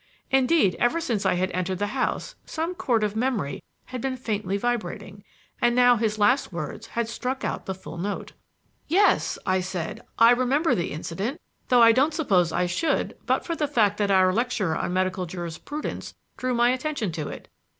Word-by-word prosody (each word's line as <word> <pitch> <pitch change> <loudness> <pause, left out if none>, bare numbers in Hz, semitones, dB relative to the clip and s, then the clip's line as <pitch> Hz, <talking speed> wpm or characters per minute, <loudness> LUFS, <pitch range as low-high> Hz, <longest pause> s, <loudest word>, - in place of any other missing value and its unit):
Indeed, 265 - +3
ever 240 +8 +2
since 235 -11 -1
I - - +2
had 185 +1 0
entered 185 +1 -2
the 205 - 0
house 270 - -1
some 325 +3 -3
chord 240 -10 0
of 210 0 -1
memory 220 - -1 0.2
had 255 -2 -6
been 260 0 -2
faintly 210 -5 -2
vibrating, 210 -3 -3 0.4
and 240 0 +3
now 245 0 +6
his 215 -2 0
last 245 +5 +3
words 175 +6 -6
had 235 0 -2
struck 255 +3 -3
out - - -4
the 190 - -2
full 170 -2 -9
note. 200 +3 -4 0.6
"Yes," 390 +7 +3
I 185 0 +2
said, 185 +3 -4 0.2
"I 230 +1 +7
remember 260 +6 +2
the 170 - -1
incident, 195 - -4 0.3
though 245 -2 +6
I 230 - +8
don't 280 +6 +2
suppose 185 - +2
I 180 - +1
should 175 - 0
but - - +1
for 335 - -2
the 300 -2 0
fact 215 -7 +2
that 205 -1 +1
our 185 -1 +4
lecturer 215 -7 0
on - - -2
medical 185 0 0
jurisprudence 175 - -6 0.2
drew 255 -1 -1
my 240 +1 +4
attention 255 - -2
to 155 -3 -4
it." - - -8
225 Hz, 185 wpm, -25 LUFS, 185-255 Hz, 0.6 s, I